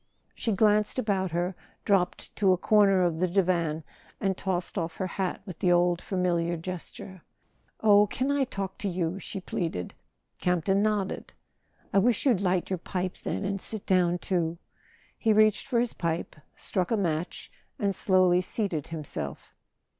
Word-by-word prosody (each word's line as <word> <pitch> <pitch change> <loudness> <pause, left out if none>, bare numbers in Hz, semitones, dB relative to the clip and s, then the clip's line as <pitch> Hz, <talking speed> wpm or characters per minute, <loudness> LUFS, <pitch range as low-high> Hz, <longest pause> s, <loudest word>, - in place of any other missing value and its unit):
She 225 - -2
glanced 210 +2 +3
about 200 -6 0
her, 175 +2 -1 0.3
dropped 190 -3 0
to 195 -2 +4
a - - +1
corner 195 -1 +4
of 170 -2 0
the 185 - +2
divan, 170 -4 +1 0.4
and 195 -2 0
tossed 185 -2 -2
off 165 -4 -2
her 190 - -1
hat 185 +1 -3
with 185 -5 -8
the 180 -3 +3
old 175 0 +3
familiar 175 -2 0
gesture. 185 +1 -7 0.6
"Oh, 205 -1 +6
can 260 +6 -1
I 285 -1 +2
talk 195 -5 -5
to 205 - -2
you?" 175 0 -2
she 195 - -5
pleaded. 165 - -3 0.5
Camp 180 -2 0
ton 195 +1 +3
nodded. 210 -2 -1 0.6
"I 200 - +5
wish 230 +5 +2
you'd 235 -9 +3
light 185 -1 0
your 185 - -1
pipe, 185 +1 -3
then, - - -3
and 195 -1 -2
sit 220 -3 -3
down 180 -2 +3
too." 170 -1 -1 0.6
He 220 -2 +3
reached 215 +2 +4
for 250 -4 +2
his 240 0 0
pipe, 170 -1 -2 0.2
struck 185 -2 -2
a 225 - +2
match, 170 -3 -2 0.3
and 200 -6 0
slowly 185 -1 +4
seated 185 -6 -3
himself. 155 -3 -6
185 Hz, 165 wpm, -28 LUFS, 175-200 Hz, 0.6 s, Oh